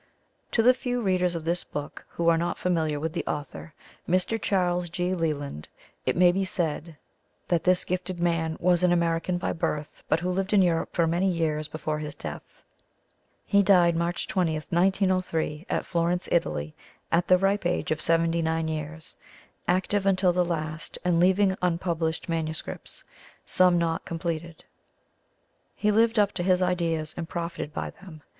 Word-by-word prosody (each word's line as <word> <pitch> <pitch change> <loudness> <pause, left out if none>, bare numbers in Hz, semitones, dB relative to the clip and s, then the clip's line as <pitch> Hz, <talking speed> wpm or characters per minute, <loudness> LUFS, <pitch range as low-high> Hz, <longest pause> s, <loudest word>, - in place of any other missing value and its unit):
To 225 - +3
the 250 +2 +7
few 245 -1 -2
readers 185 -5 +1
of 165 -1 -5
this 175 +1 0
book 145 0 -7
who 170 - -2
are 165 -1 +5
not 170 +1 -1
familiar 160 -5 0
with 160 +1 -3
the 175 - -2
author, 150 +2 -5 0.4
Mr. 185 +5 +1
Charles 180 -2 +1
G. 180 +2 -1
Leland, 145 - -3 0.4
it - - +2
may 175 0 +6
be 195 +2 0
said 165 -3 -3 0.5
that 170 -3 +1
this 180 0 +3
gifted 185 0 -3
man 165 -2 0
was 180 0 +3
an 180 -1 +4
American 170 +1 +1
by 175 - -2
birth, 150 -2 -3
but 160 - +3
who 180 +2 -1
lived 195 +3 -1
in 200 -2 +6
Europe 165 -2 +1
for 170 - +3
many 175 +4 +1
years 155 -3 -1
before 155 0 -3
his 150 -1 -6
death. - - -9 0.8
He 200 -1 +4
died 180 -4 +5
March 170 +1 -1
20, 175 -4 +1
1903, 180 -1 0
at - - -1
Florence, 175 +1 0
Italy, 75 - 0 0.4
at 170 +1 +2
the 185 - +6
ripe 195 0 +1
age 175 - -1
of 155 0 0
79 165 -1 +2
years, 160 +2 -5 0.5
active 190 +2 +1
until 185 -2 +3
the 180 0 +2
last 155 -2 -4
and 175 -2 +3
leaving 190 +2 +4
unpublished 170 -2 -1
manuscripts, 160 -2 -4 0.4
some 180 -1 +4
not 165 -1 0
completed. 165 0 -4 1.1
He 210 - +1
lived 225 +2 +3
up 205 -1 +4
to - - -4
his 185 0 +3
ideas 165 -3 0
and 165 -1 -5
profited 170 -3 -4
by - - -4
them. 160 -6 -14
170 Hz, 165 wpm, -26 LUFS, 160-185 Hz, 1.1 s, the